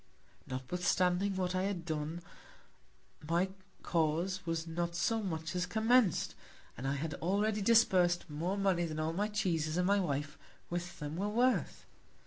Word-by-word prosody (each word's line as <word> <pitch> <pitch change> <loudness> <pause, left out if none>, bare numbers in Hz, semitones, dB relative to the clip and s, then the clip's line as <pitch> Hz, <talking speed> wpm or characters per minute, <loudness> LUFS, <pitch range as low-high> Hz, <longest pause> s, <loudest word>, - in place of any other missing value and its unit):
Notwithstanding 180 +8 0
what 185 -1 -1
I 185 - +1
had 190 -4 -3
done, 160 +1 -3 1.0
my 170 +5 +1 0.3
Cause 170 +3 0
was 165 0 -1
not 170 +1 -2
so 225 +6 +1
much 160 -4 -3
as 180 0 0
commenc'd; 220 0 +3 0.4
and 135 - -4
I 135 - 0
had 150 +2 -3
already 205 +4 +1
disburs'd 190 -6 +4
more 170 +6 -2
Money 190 -3 +2
than 155 -1 -4
all 155 +1 -1
my 205 +5 0
Cheeses 175 -7 0
and 180 - +2
my 200 +2 +4
Wife 145 -4 -2 0.3
with 175 0 -4
them 150 +2 -5
were 200 +3 -1
worth. 245 +4 +1
175 Hz, 150 wpm, -33 LUFS, 160-195 Hz, 1.0 s, disburs'd